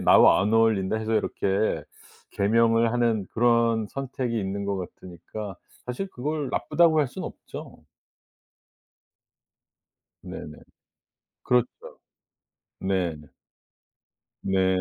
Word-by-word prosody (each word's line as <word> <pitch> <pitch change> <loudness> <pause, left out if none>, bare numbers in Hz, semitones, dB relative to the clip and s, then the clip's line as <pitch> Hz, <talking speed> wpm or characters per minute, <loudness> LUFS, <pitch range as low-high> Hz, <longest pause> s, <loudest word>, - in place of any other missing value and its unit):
나와 - - +6
안 105 +2 0
어울린다." 110 -3 +3
해서 110 0 -1
이렇게 100 0 0 0.5
개명을 115 +2 +3
하는 115 -5 +1
그런 115 -2 +3
선택이 130 -3 -3
있는 100 0 -3
거 100 -1 -1
같으니까 95 +2 -8 0.3
사실 125 +11 -3
그걸 145 +2 -3
나쁘다고 165 -2 +3
할 140 - +1
순 - - -7
없죠. - - -9 2.4
네네. - - -8 0.9
그렇죠. 125 -1 +3 1.1
네네. 85 -6 -1 1.1
네. 95 -1 +2
110 Hz, 200 characters per minute, -26 LUFS, 95-120 Hz, 2.4 s, 나와